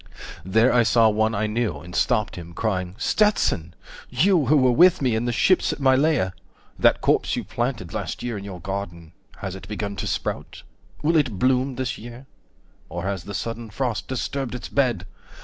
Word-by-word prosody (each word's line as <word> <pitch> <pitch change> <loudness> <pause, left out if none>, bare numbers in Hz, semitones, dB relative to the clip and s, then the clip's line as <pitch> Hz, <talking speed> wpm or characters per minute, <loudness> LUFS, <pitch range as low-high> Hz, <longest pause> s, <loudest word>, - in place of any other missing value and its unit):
There 110 +7 +3
I 120 - +5
saw 115 0 +4
one 110 +1 +1
I 105 +2 0
knew, 110 -5 -1
and 90 +5 -10
stopped 115 -4 +1
him, 85 -1 -9
crying 95 -4 -2
"Stetson! 100 - +1 0.3
You 180 -7 +3
who 150 +3 +5
were 130 -2 +4
with 180 +8 +6
me 130 -4 +1
in 110 +2 0
the 120 - 0
ships 185 +9 +3
at - - -5
Mylae! 135 +3 +4
70 95 -8 -1 0.5
That - - +4
corpse - - +2
you - - -3
planted 120 -8 -3
last - - -4
year 120 -2 -3
in 100 - -6
your 95 -3 -7
garden, 90 -3 -6 0.3
Has 95 -2 -4
it 95 - -10
begun 100 -1 -4
to - - -3
sprout? - - -4 0.4
Will 165 +2 +3
it 130 -10 +1
bloom 130 +3 +1
this 130 -1 -3
year? 120 +3 -10 0.6
Or 85 +2 -5
has 95 -3 -3
the 100 - -6
sudden 115 +1 -4
frost 120 +1 -2
disturbed 130 0 -3
its 125 - -7
bed? 120 -9 +1
115 Hz, 190 wpm, -23 LUFS, 95-130 Hz, 0.6 s, with